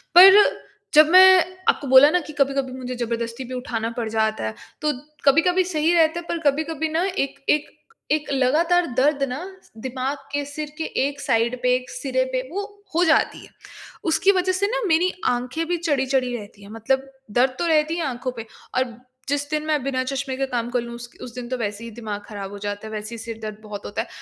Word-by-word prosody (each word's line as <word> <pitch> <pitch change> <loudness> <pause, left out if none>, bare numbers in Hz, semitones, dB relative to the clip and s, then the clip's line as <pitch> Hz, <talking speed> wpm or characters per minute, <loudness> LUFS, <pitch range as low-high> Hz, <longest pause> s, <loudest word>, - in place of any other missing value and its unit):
पर 385 +3 +10 0.5
जब 305 0 +8
मैं 375 +1 +8 0.3
आपको 285 - 0
बोला 265 +2 +8
ना 360 - +3
कि 305 -1 -10
कभी-कभी 275 -2 0
मुझे 255 -1 -5
ज़बरदस्ती 235 +1 -3
भी 255 - -8
उठाना 230 -3 -3
पड़ 230 -2 -2
जाता 220 0 0
है, 110 0 -4 0.3
तो 300 - +2 0.3
कभी-कभी 345 +6 +4
सही 330 -2 +1
रहता 330 0 +3
है, 345 - -10
पर 340 - -1
कभी-कभी 315 +2 -2
ना 320 +3 0
एक 365 -8 -2
एक, 300 0 +2 0.4
एक 305 -1 0
लगातार 320 +7 +3
दर्द 280 +1 +3
ना 260 +7 -4 0.2
स - - -25
दिमाग 260 +4 -3
के, 285 0 -1
सिर 295 +1 -6
के 320 - -2 0.2
एक 285 0 -7
साइड 235 0 0
पे, 250 0 +3
एक 255 +1 -4
सिरे 260 -2 -1
पे, 255 - +1
वो 400 +3 -3 0.3
हो 345 - +4
जाती 315 -2 +2
है। - - -18 0.6
उसकी 330 +4 +4
वजह 370 -1 +1
से 390 +2 +1
ना - - -1
मेरी 350 +2 +3 0.2
आँखें 250 +6 -2
भी 350 0 0
चढ़ी-चढ़ी 265 -6 0
रहती 205 -1 -12
हैं, 200 - -12
मतलब 265 +5 -1 0.2
दर्द 255 +4 +2
तो 345 - 0
रहती 315 0 +2
है 335 - -1
आँखों 255 -1 -3
पे, 225 - -6 0.3
और 250 -3 -1 0.3
जिस 285 0 -1
दिन 305 0 -1
मैं 305 -2 +1
बिना 260 -1 -1
चश्मे 270 0 -3
के 270 - 0
काम 240 -2 -2
कर 245 0 0
लूँ, 235 0 -7
उस 240 0 -9
उस 240 -2 -9
दिन 250 -1 -6
तो 255 - -2
वैसे 210 -1 -4
ही 230 - -7
दिमाग 215 -2 -6
खराब 200 -3 -7
हो 205 - -7
जाता 205 +1 -5
है, - - -9
वैसे 215 +2 -5
ही - - -8
सिर 225 0 -7
दर्द 215 -1 -6
बहुत 210 -1 -8
होता 210 - -3
है। 230 - -7
265 Hz, 220 wpm, -23 LUFS, 235-315 Hz, 0.6 s, पर